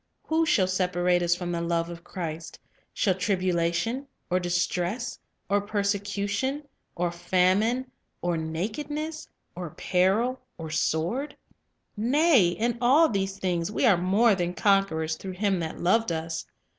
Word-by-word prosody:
"Who 320 Hz, +1 st, +1 dB
shall 195 Hz, -10 st, +4 dB
separate 180 Hz, -1 st, +1 dB
us 175 Hz, 0 st, +2 dB
from 175 Hz, -1 st, -4 dB
the 170 Hz, -1 st, -2 dB
love 170 Hz, 0 st, 0 dB
of 170 Hz, 0 st, -9 dB
Christ? 165 Hz, -3 st, -6 dB, 0.3 s
shall 190 Hz, -, +1 dB
tribulation, 185 Hz, +6 st, 0 dB, 0.2 s
or 180 Hz, -, +3 dB
distress, 180 Hz, +5 st, -1 dB, 0.3 s
or 200 Hz, +1 st, +2 dB
persecution, 205 Hz, +6 st, -1 dB, 0.3 s
or 175 Hz, 0 st, 0 dB
famine, 190 Hz, +9 st, +1 dB, 0.3 s
or 175 Hz, -1 st, -1 dB
nakedness, 290 Hz, -, -4 dB, 0.3 s
or 175 Hz, -2 st, -5 dB
peril, 195 Hz, -, +1 dB, 0.2 s
or 160 Hz, -2 st, -6 dB
sword?... 170 Hz, -, -1 dB, 0.6 s
Nay, 255 Hz, -, +4 dB
in 230 Hz, +7 st, -1 dB
all 285 Hz, +7 st, +5 dB
these 195 Hz, -2 st, -2 dB
things 180 Hz, -2 st, -1 dB
we 240 Hz, -, +1 dB
are 215 Hz, -6 st, +6 dB
more 195 Hz, +6 st, +3 dB
than 180 Hz, -2 st, -2 dB
conquerors 160 Hz, -6 st, +2 dB
through 190 Hz, -1 st, -6 dB
Him 195 Hz, 0 st, 0 dB
that 160 Hz, -1 st, -4 dB
loved 210 Hz, +3 st, +2 dB
us. 160 Hz, 0 st, -3 dB
185 Hz, 135 wpm, -27 LUFS, 175-225 Hz, 0.6 s, are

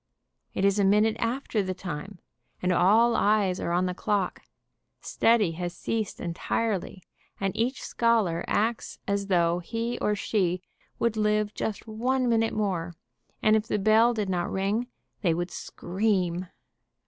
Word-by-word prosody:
It 195 Hz, -, +1 dB
is 200 Hz, +1 st, +3 dB
a -, -, +4 dB
minute 210 Hz, +3 st, +4 dB
after 230 Hz, -2 st, -1 dB
the 185 Hz, -1 st, -3 dB
time, 180 Hz, +1 st, -6 dB, 0.4 s
and 180 Hz, -, 0 dB
all 215 Hz, +7 st, +4 dB
eyes 205 Hz, -3 st, +2 dB
are -, -, -2 dB
on 180 Hz, +1 st, +2 dB
the 180 Hz, -, -1 dB
clock, 195 Hz, 0 st, -1 dB, 0.6 s
study 225 Hz, -6 st, +2 dB
has 175 Hz, +1 st, -5 dB
ceased 220 Hz, -3 st, -3 dB
entirely, 185 Hz, +2 st, -2 dB, 0.4 s
and 195 Hz, -1 st, -1 dB
each 250 Hz, +4 st, -1 dB
scholar 225 Hz, -8 st, +1 dB
acts 225 Hz, +2 st, -1 dB
as 200 Hz, -1 st, -1 dB
though 175 Hz, -2 st, +2 dB
he 230 Hz, +6 st, -3 dB
or 210 Hz, -, +1 dB
she 185 Hz, -3 st, 0 dB, 0.3 s
would 230 Hz, -2 st, 0 dB
live 210 Hz, 0 st, +1 dB
just 215 Hz, -, -4 dB
one 250 Hz, +4 st, 0 dB
minute 225 Hz, -1 st, +2 dB
more, 180 Hz, -5 st, -1 dB, 0.5 s
and 215 Hz, -1 st, +5 dB
if 220 Hz, 0 st, 0 dB
the -, -, 0 dB
bell 220 Hz, +4 st, +4 dB
did 210 Hz, -2 st, -1 dB
not 180 Hz, -2 st, -1 dB
ring, 200 Hz, +5 st, 0 dB, 0.3 s
they 170 Hz, -5 st, +2 dB
would 175 Hz, +1 st, -3 dB
scream. 185 Hz, -2 st, -1 dB
205 Hz, 150 wpm, -27 LUFS, 180-225 Hz, 0.6 s, and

